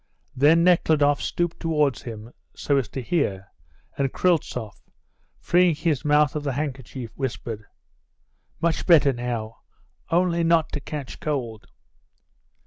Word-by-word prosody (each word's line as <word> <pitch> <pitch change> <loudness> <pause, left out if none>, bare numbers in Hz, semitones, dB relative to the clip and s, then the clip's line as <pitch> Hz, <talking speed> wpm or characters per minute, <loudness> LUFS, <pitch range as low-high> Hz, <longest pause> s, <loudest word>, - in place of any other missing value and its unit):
Then 155 +5 +5
Nekhludoff 155 -5 +3
stooped 175 -1 -2
towards 150 -5 0
him, 115 0 -9 0.2
so 140 - 0
as 125 -6 -1
to 130 - -5
hear, 100 - -1 0.5
and 135 -1 +1
Kryltzoff, 140 - -1 0.6
freeing 175 -2 +3
his 155 -3 -1
mouth 150 -1 +3
of 150 - -1
the 140 -2 -2
handkerchief, 130 -4 -5
whispered: 115 -5 -5 0.9
"Much 170 -1 -1
better 150 -6 +6
now. 120 -2 -4 0.5
Only 170 0 +2
not 165 -1 +2
to 145 - -3
catch 145 -2 -7
cold." 120 -8 -4
145 Hz, 125 wpm, -24 LUFS, 125-165 Hz, 0.9 s, better